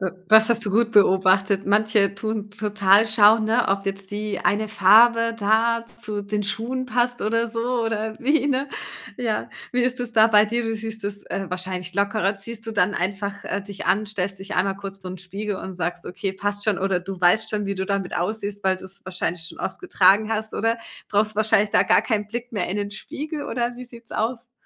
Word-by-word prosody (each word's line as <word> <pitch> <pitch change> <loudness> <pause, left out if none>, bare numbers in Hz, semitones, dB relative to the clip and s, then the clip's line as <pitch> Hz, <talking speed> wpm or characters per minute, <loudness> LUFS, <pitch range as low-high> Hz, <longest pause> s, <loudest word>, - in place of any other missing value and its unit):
Äh, 190 -1 -1 0.2
das 220 0 +7
hast 235 -1 +1
du - - 0
gut 225 +2 +2
beobachtet. 190 0 +3
Manche 205 -1 +2
tun 215 0 -4
total 205 0 +3
schauen, 220 0 +5
ne, 225 +2 +1
ob 195 0 0
jetzt 195 0 -4
die 210 0 -3
eine 215 +2 +1
Farbe 230 +3 +5
da 230 +2 +2 0.2
zu 210 -1 -4
den 210 +1 -2
Schuhen 245 +5 -2
passt 245 +1 0
oder 230 +2 +1
so 235 +1 -1
oder 220 -1 -2
wie, 285 +4 +2
ne, 275 0 0 0.5
ja. 225 -4 -2 0.2
Wie 250 - +1
ist 250 0 0
es 245 -1 -4
da 220 -1 +6
bei 210 -2 +5
dir? 235 +3 -1
Du 225 -1 -2
siehst 220 -1 -5
es, 200 0 -3
äh, 195 - -4
wahrscheinlich 180 0 -4
lockerer. 200 0 +1
Ziehst 225 +3 -7
du 225 - -4
dann 205 -1 +1
einfach, 200 +2 -3
äh, 200 - -2
dich 200 -1 -8
an, 215 +2 +2
stellst 195 -2 -3
dich 195 +2 -7
einmal 195 +1 +1
kurz 195 -1 -8
vorn 185 -1 -8
Spiegel 195 +3 -5
und 190 -1 -7
sagst: 175 0 -3
„Okay, 195 +1 -4
passt 205 +1 -3
schon.“ 215 -3 +1
Oder 190 -2 0
du 185 0 -7
weißt 200 +5 +3
schon, 210 -2 -2
wie 200 - -2
du 190 0 -3
damit 200 -2 -2
aussiehst, 205 +2 -3
weil 190 -1 +2
du's 190 +1 -8
wahrscheinlich 180 -2 -3
schon - - -9
oft - - -4
getragen 215 - +4
hast, 220 0 -3
oder? 225 +2 0 0.3
Brauchst 215 +1 +1
wahrscheinlich 215 -1 +3
da - - +4
gar - - +4
keinen 210 -3 -1
Blick 240 +3 -6
mehr 205 - -2
in 190 - -3
den 205 0 -3
Spiegel 295 +8 -6
oder 240 0 -2
wie 250 - -8
sieht's 235 -2 -14
aus? 230 +2 -3
210 Hz, 210 wpm, -23 LUFS, 195-225 Hz, 0.5 s, das